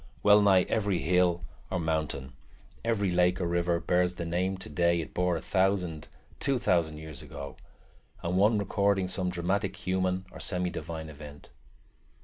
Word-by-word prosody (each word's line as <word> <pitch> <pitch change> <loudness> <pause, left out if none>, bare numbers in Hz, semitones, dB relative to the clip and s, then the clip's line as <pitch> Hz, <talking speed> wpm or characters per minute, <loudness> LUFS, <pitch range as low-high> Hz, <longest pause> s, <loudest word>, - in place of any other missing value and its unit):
Well 105 0 +7
nigh 95 -3 +5
every 100 -4 0
hill 90 0 +2 0.3
or 95 - -1
mountain, 80 -5 -2 0.5
every 105 -5 +1
lake 90 0 +3
or 90 - -1
river, 85 0 +1
bears 90 +1 +1
the 85 - -4
name 90 +3 -1
today 85 0 +1
it 80 - -6
bore 90 -1 +1
a - - -6
thousand, 95 -5 0 0.3
two 140 -2 +1
thousand, 85 -8 +1
years 80 -1 -8
ago, - - -8 0.7
and 85 +2 -1
one 105 +4 +4
recording 100 -1 +1
some 90 0 -2
dramatic 95 +3 -1
human 95 0 0
or - - -10
semi 90 -2 -2
divine 80 -1 -6
event. 75 -1 -11
90 Hz, 155 wpm, -29 LUFS, 85-95 Hz, 0.7 s, Well